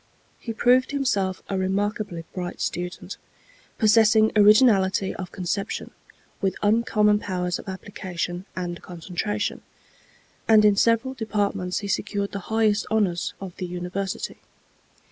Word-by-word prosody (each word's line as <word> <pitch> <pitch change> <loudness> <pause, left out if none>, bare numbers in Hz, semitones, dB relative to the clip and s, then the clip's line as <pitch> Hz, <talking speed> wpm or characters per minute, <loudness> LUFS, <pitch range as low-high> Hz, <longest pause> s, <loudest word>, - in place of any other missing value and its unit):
He 230 - -5
proved 250 +3 +3
himself 205 -10 -1
a 195 - -2
remarkably 195 -2 -2
bright 180 -1 -5
student, 180 +1 -4 0.6
possessing 220 0 +5
originality 205 -3 +5
of 185 -2 -7
conception, 195 +2 -3 0.5
with 195 -2 0
uncommon 210 -1 +3
powers 180 -3 -2
of - - -11
application 185 -1 -5
and 175 -1 -4
concentration; 185 +4 -3 0.9
and 215 -1 +6
in 205 -1 +5
several 230 +5 +2
departments 205 -6 -2
he 200 - -5
secured 200 0 -2
the 200 - -4
highest 220 -1 +2
honors 195 -6 0
of 190 -3 -8
the 180 - -4
University. 180 +2 -4
200 Hz, 120 wpm, -24 LUFS, 185-215 Hz, 0.9 s, and